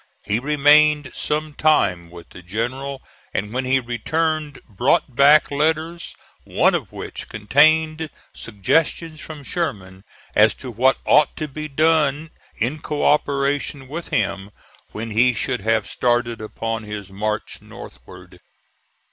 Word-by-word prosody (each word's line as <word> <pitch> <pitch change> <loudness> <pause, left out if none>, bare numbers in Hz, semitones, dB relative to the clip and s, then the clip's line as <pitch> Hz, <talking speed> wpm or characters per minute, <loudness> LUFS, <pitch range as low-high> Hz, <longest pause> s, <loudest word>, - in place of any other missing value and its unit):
He 105 +3 0
remained 150 +1 +4
some 155 0 -2
time 90 - +2
with 85 -1 -13
the - - -12
general, 130 +9 -4 0.3
and 105 +2 -2
when 130 +1 -1
he 130 +1 +3
returned 155 +5 -2
brought 120 +4 0
back 145 +3 +6
letters, 160 +3 -1 0.3
one - - +2
of - - -3
which - - -8
contained 155 +8 +2 0.2
suggestions 155 - -1
from 155 -3 -9
Sherman 100 - -4 0.3
as 105 +1 +4
to 130 - -8
what 130 +4 +3
ought 150 - +4
to 155 - -3
be 155 +2 -6
done 155 0 +1 0.2
in 130 +7 -2
co 150 -1 -2
operation 140 -1 0
with 165 +5 -6
him, 100 -2 -1 0.4
when 110 +1 -6
he 120 +3 +3
should 125 -1 -2
have 110 +2 +1
started 120 -2 0
upon 115 +1 -4
his 105 -2 -7
march 105 +2 -3
northward. - - -13
135 Hz, 130 wpm, -21 LUFS, 110-155 Hz, 0.4 s, back